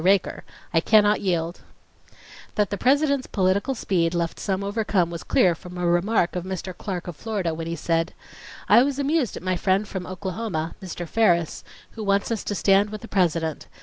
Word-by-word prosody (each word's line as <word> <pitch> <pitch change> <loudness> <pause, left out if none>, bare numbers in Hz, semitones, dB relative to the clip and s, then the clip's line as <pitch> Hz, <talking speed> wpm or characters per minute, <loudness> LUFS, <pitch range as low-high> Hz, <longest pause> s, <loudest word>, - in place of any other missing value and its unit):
RAKER: 190 +1 +2 0.3
I 165 - +5
cannot 210 +3 +4
yield.... 175 -2 -1 0.9
That 210 -1 +1
the 200 - -1
President's 280 +1 +2
political 200 +7 +1
speed 175 -6 0
left 170 -1 -2
some 195 -1 -1
overcome 200 -4 0
was 170 0 -5
clear 180 - +3
from 180 +2 -10
a 180 - -1
remark 175 +2 +2
of 180 - -2
Mr. 185 -1 -5
Clark 180 -3 -5
of 175 - -5
Florida 195 -4 -2
when 165 0 -5
he 165 - -2
said: 165 +1 -1 0.5
"I 215 +4 +7
was 275 +1 0
amused 285 - 0
at - - -9
my 185 0 0
friend 195 +3 +1
from 185 -2 -5
Oklahoma, 185 -3 -3
Mr. 175 -2 -6
Ferris, 170 -6 +2 0.3
who 220 - -7
wants 200 +2 +1
us 225 - -1
to 205 - -2
stand 200 +1 +3
with 215 0 -7
the 230 - -9
President. 165 -6 0
190 Hz, 185 wpm, -24 LUFS, 175-210 Hz, 0.9 s, I